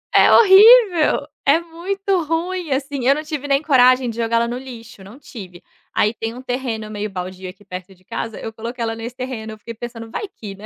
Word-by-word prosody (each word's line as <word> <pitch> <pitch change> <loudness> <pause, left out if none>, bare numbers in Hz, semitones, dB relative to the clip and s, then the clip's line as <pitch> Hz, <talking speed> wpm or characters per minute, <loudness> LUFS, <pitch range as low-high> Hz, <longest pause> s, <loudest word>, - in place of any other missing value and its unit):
É - - +6
horrível, 390 -8 +6 0.2
é 290 +4 +4
muito 365 +3 -2
ruim 330 +1 -3
assim. 270 -1 -2
Eu 275 - +5
não 305 - -4
tive 300 -2 -5
nem 275 +2 +1
coragem 255 -3 +4
de - - -11
jogar 230 0 -1
ela 235 0 +1
no 240 - -4
lixo, 235 -6 -11
não 200 +6 -13
tive. 185 -11 -11 0.3
Aí 215 +2 +1
tem 225 +1 -5
um 255 - -9
terreno 245 -4 -4
meio 210 0 -4
baldio 185 0 -7
aqui 195 +3 -15
perto 185 0 -9
de 185 - -28
casa, 225 -2 -5
eu 225 - -7
coloquei 235 +2 -6
ela 225 0 -2
nesse 230 +2 -7
terreno, 250 -4 -6
eu - - -12
fiquei 230 +2 -9
pensando 230 0 -9
vai 425 - -4
que, 215 - -10
né. 205 - -12
245 Hz, 220 wpm, -20 LUFS, 220-300 Hz, 0.3 s, É